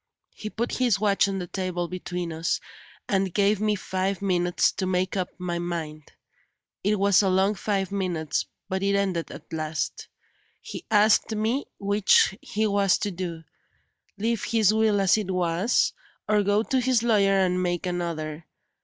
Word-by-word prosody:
He 215 - -6
put 235 +3 -3
his 240 -6 +2
watch 205 -1 +3
on 195 -1 -2
the 180 - -3
table 180 -1 -3
between 175 -1 -5
us, 160 +1 -1 0.5
and 195 -1 +1
gave 205 +2 +2
me 215 -1 +2
five 190 0 -2
minutes 180 -3 +1
to 190 -1 -3
make 185 +1 0
up 185 -2 -1
my 175 -1 -3
mind. 160 -4 -5 0.7
It 210 +2 +2
was 200 0 +4
a 195 - +1
long 190 +2 +3
five 195 -1 -2
minutes, 180 -6 -2 0.2
but 190 -1 -2
it 200 0 +1
ended 190 -4 -1
at - - -11
last. 155 0 -3 0.5
He - - -8
asked 215 +1 +4
me 225 +6 0
which 200 -1 +3
he 215 +1 -1
was 200 -2 +3
to 205 - -2
do 170 -3 -5 0.7
leave 225 0 -1
his 220 -2 +3
will 220 -2 +3
as 195 +2 +4
it 200 -3 -4
was, 180 +4 +1 0.3
or 210 0 +3
go 205 +2 +2
to 265 +1 0
his 245 -2 +2
lawyer 200 -4 +3
and 185 -1 +1
make 175 0 -1
another. 165 -3 -4
195 Hz, 165 wpm, -25 LUFS, 180-210 Hz, 0.7 s, was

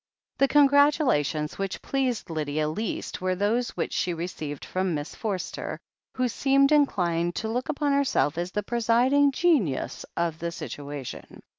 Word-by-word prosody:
The 275 - +5
congratulations 280 - +3
which 195 -1 -3
pleased 255 -8 -1
Lydia 155 -1 -1
least 190 +6 -4
were 185 0 0
those 220 +6 +1
which - - -2
she 175 -2 0
received 160 -4 -5
from 185 -2 -1
Miss 145 +1 -5
Forster, 200 -5 -4 0.4
who 255 0 +1
seemed 275 +4 +3
inclined 175 - +2
to 220 - -2
look 245 +5 -2
upon 290 -1 0
herself 280 - +2
as 175 +1 -2
the 210 - -2
presiding 240 +6 +3
genius 270 - +1
of 170 -2 -1
the 170 0 -3
situation. 145 -3 -7
200 Hz, 145 wpm, -26 LUFS, 165-270 Hz, 0.4 s, The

